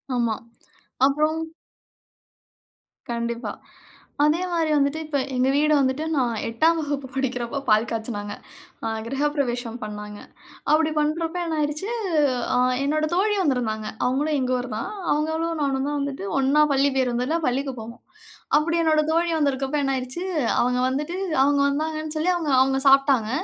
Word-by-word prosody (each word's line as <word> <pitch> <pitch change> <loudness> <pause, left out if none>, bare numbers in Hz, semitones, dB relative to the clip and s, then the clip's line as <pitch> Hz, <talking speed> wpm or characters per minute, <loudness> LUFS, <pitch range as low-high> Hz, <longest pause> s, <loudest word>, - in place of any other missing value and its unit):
ஆமா. 235 -3 +1 0.7
அப்புறம் 305 +3 +2 1.7
கண்டிப்பா. 235 0 -3 0.7
அதே 305 +4 +3
மாரி 330 -2 +1
வந்துட்டு, 280 +2 +1
இப்ப 295 -2 -1 0.2
எங்க 255 +1 +2
வீடு 300 +1 +3
வந்துட்டு, 270 +3 +1
நான் 250 -4 +1
8 315 +9 +2
வகுப்பு 285 -3 -3
படிக்கிறப்போ, 260 0 -2
பால் 215 +2 +4
காய்ச்சனாங்க, 220 -2 -4 0.5
அ, - - 0 0.2
கிரகப்பிரவேசம் 260 -4 -1
பண்ணாங்க. 210 0 -7 0.5
அப்டி 315 0 +3
பண்றப்ப 325 +3 -1
என்ன 320 -1 -2
ஆயிருச்சு, 300 +6 -2 0.7
ஆ, - - +3 0.3
என்னோட 310 +2 +1
தோழி 415 +4 +2
வந்திருந்தாங்க. 225 -7 -1 0.2
அவுங்களும் 290 +4 +1
எங்க 255 0 0
ஊருதான், 245 - -4 0.2
அவுங்களும் 320 +2 -1
நானும் 270 -1 0
தான் 290 0 -1
வந்துட்டு 275 -8 -4
ஒண்ணா 280 +3 +4
பள்ளி 275 +1 +3
பேருந்துல 250 +5 0
பள்ளிக்கு 270 +2 -1
போவோம். 230 +2 -10 0.6
அப்டி 335 +2 0
என்னோட 310 -1 +3
தோழி 335 +1 +2
வந்திருக்கப்ப 280 0 0
என்ன 270 -1 +1
ஆயிருச்சு, 260 +7 -4 0.4
அவங்க 250 +1 +1
வந்துட்டு, 295 +7 -2 0.3
அவுங்க 285 0 +3
வந்தாங்கன்னு 310 +2 -2
சொல்லி 350 +4 +2
அவுங்க 315 -5 -1
அவுங்க 270 0 +1
சாப்ட்டாங்க, 270 -5 +4
280 Hz, 135 wpm, -24 LUFS, 250-310 Hz, 1.7 s, பால்